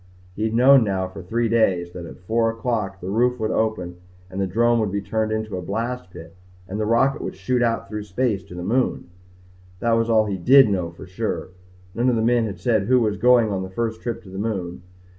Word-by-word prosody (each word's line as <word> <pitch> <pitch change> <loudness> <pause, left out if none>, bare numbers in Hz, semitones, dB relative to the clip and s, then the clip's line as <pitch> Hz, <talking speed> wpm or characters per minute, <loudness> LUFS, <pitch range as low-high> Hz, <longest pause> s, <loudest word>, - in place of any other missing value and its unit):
He 110 - -1
had 110 0 -1
known 130 +1 +7
now 95 -3 -1
for 95 +1 -10
three 115 +6 -1
days 95 -7 +1
that 85 -1 -8
at - - -11
four 115 +4 +1
o'clock 115 -4 -3
the 90 +2 -4
roof 125 +3 +1
would 110 - -1
open 90 -6 -1 0.3
and 95 +1 -3
the 95 - 0
drome 120 +5 +2
would 105 -3 0
be 100 - -1
turned 110 +2 -2
into 110 -2 -3
a - - -4
blast 115 +1 -4
pit 85 -2 -12 0.3
and 100 +3 -5
the 105 - -1
rocket 135 +4 +2
would - - -5
shoot 125 -1 -1
out 115 -3 0
through 105 0 -5
space 105 -1 -1
to 90 - -11
the 90 - -5
moon. 115 -2 -1 0.7
That 115 - 0
was 115 0 +2
all 110 -1 +4
he 100 -3 -3
did 130 +5 +6
know 90 -4 -1
for 85 +3 -12
sure. 95 +4 -4 0.4
None 120 +2 +1
of 125 - +2
the 110 - 0
men 120 -1 +2
had 100 - -6
said 110 -5 +1
who 130 +1 +4
was 105 -4 0
going 120 0 +4
on 95 -1 -2
the 95 - -5
first 110 +3 -3
trip 120 -2 -4
to 95 - -13
the 95 +1 -7
moon. 95 -5 -3
110 Hz, 235 wpm, -22 LUFS, 95-115 Hz, 0.7 s, known